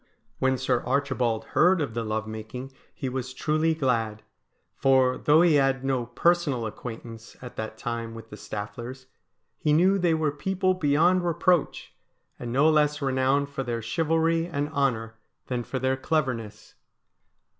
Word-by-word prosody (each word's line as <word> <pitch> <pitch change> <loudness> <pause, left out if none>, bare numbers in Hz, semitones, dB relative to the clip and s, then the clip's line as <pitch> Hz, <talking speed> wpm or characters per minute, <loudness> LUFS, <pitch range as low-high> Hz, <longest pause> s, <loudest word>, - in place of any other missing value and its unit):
When 130 0 +2
Sir 125 -1 0
Archibald 125 -4 0
heard 180 +2 +4
of 140 -7 -2
the 115 0 -2
love 110 0 -2
making 110 +5 -7 0.2
he 135 - -5
was 130 0 -4
truly 155 +3 +1
glad; 115 -7 -1 0.5
for, 130 -1 +3
though 155 +3 +4
he 170 -3 +4
had 135 -1 0
no 130 -3 0
personal 145 -2 +1
acquaintance 115 0 -8
at 125 -1 -10
that 110 0 -5
time 115 -1 -4
with 115 0 -11
the - - -7
Stafflers, 120 +6 -7 0.5
he 150 - +2
knew 185 +5 +4
they 175 -3 +2
were 155 -2 0
people 185 +5 0
beyond 175 +2 +3
reproach, 175 -1 +1 0.5
and 120 - -5
no 140 +5 +4
less 150 -1 +3
renowned 135 +1 +1
for 140 -1 -4
their 120 -3 -3
chivalry 165 +5 +1
and 145 -4 -2
honour 115 -6 -1 0.3
than 125 -2 -3
for 130 - -4
their 130 +1 0
cleverness. 125 -8 -2
130 Hz, 155 wpm, -26 LUFS, 115-155 Hz, 0.5 s, heard